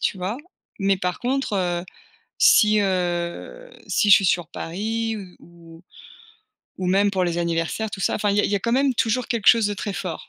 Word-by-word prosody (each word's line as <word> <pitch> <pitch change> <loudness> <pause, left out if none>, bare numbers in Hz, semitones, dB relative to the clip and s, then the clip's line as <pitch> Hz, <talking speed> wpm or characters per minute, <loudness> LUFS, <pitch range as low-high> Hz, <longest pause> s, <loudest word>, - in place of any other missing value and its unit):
tu - - -1
vois, 190 +5 -4 0.4
mais, 195 -1 +1
par 180 -1 -3
contre, 260 -2 -2
heu, 175 -2 -1 0.5
si, 215 0 +5
heu, 180 - -3 0.2
si 205 - +1
je - - +11
suis 195 - 0
sur 175 -2 0
Paris 220 +7 -3
ou 190 -4 -11
ou 170 0 -17 1.0
ou 185 - -3
même 200 +2 +2
pour 190 -2 -1
les 170 -1 -2
anniversaires, 170 +5 -2
tout 195 - -7
ça, - - 0
enfin, 205 -1 0
il 200 - 0
y - - +6
a - - -1
il - - -1
y - - +1
a - - -1
quand 235 - -1
même 270 0 +2
toujours 230 +2 0
quelque 230 -3 -3
chose 230 -3 +6
de 205 - -2
très 200 0 -5
fort. 180 -4 -6
195 Hz, 215 wpm, -22 LUFS, 175-220 Hz, 1.0 s, je